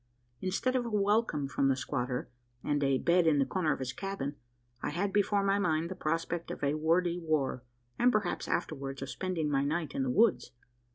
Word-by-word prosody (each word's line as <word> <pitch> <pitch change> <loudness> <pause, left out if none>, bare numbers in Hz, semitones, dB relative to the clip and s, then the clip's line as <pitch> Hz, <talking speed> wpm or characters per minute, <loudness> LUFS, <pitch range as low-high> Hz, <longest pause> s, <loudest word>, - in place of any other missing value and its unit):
Instead 195 +8 0
of 255 - +2
a 235 - -4
welcome 205 -8 +1
from 135 0 +1
the 135 - +3
squatter, 125 -1 -2 0.4
and 145 -1 0
a 135 -1 +3
bed 170 +4 +3
in 155 -2 +4
the 135 - +3
corner 170 -2 0
of - - 0
his 130 -1 -4
cabin, 190 -5 -4 0.5
I - - -1
had 190 +6 -1
before 205 0 +2
my 200 0 +2
mind 165 -2 0
the - - -4
prospect 165 +1 -2
of - - -6
a 140 +1 +2
wordy 170 +3 +1
war; 155 -6 0 0.4
and, 250 +1 +5
perhaps 210 -5 -1
afterwards, 135 -2 -3
of 135 - -5
spending 170 -5 -2
my 135 -1 +2
night 155 +2 -1
in - - -1
the 130 - 0
woods. 195 - +3
160 Hz, 205 wpm, -31 LUFS, 140-195 Hz, 0.5 s, and